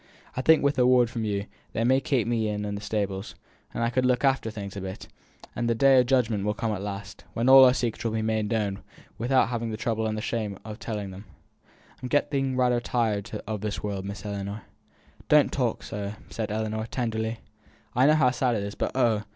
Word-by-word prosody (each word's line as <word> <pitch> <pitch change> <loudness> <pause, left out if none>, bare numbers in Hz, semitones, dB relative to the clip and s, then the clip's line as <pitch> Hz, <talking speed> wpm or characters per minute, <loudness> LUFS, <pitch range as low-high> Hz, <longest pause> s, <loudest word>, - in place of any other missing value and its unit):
I 130 - -1
think, 160 +3 +5
wi' 140 0 +3
a 125 - +5
word 125 -2 +4
from 115 -2 -3
you, 100 -1 -1 0.3
they'd 115 - 0
maybe 130 +3 +3
keep 130 -4 0
me 110 -2 0
on 105 0 -3
i' 105 - -3
the 100 0 -4
stables, 100 -2 -3 0.4
and 115 - -2
I 115 - +1
could 130 +1 +1
look 125 +1 +2
after 135 -4 +2
things 100 -3 -7
a 100 - -5
bit; 95 0 -7 0.5
and 120 0 -1
the 115 - +2
Day 135 +2 +6
o' - - +5
Judgment 120 -5 +1
will 105 +1 0
come 115 -1 -1
at 100 -3 -3
last, 100 0 -6
when 115 +2 0
all 135 0 +10
our 125 - +6
secrets 120 -4 -2
will 115 -2 -1
be 110 0 -1
made 110 -1 0
known 105 -3 -1 0.4
wi'out 120 +4 -2
our 130 -1 +5
having 115 -1 -3
the 110 - -4
trouble 110 0 -1
and 110 0 -2
the - - -3
shame 110 -5 -2
o' 110 - -6
telling 105 -3 -5
'em. 95 +3 -10 0.8
I'm 125 - -4
getting 135 -2 +1
rayther 125 -1 +3
tired 115 -3 -1 0.2
o' 110 -1 -2
this 105 0 -4
world, 100 -2 -3
Miss 100 +1 -7
Ellinor." 100 0 -4 0.7
"Don't - - +5
talk - - -1
so," 100 0 -5 0.2
said 110 -2 -3
Ellinor, 110 +1 -2
tenderly. 115 -2 -2 0.6
"I 130 +3 +5
know 155 - +6
how 135 -5 +4
sad 125 -1 +1
it 100 - -2
is, 100 0 -5
but, - - -2
oh! 115 -5 +2
110 Hz, 230 wpm, -26 LUFS, 105-125 Hz, 0.8 s, all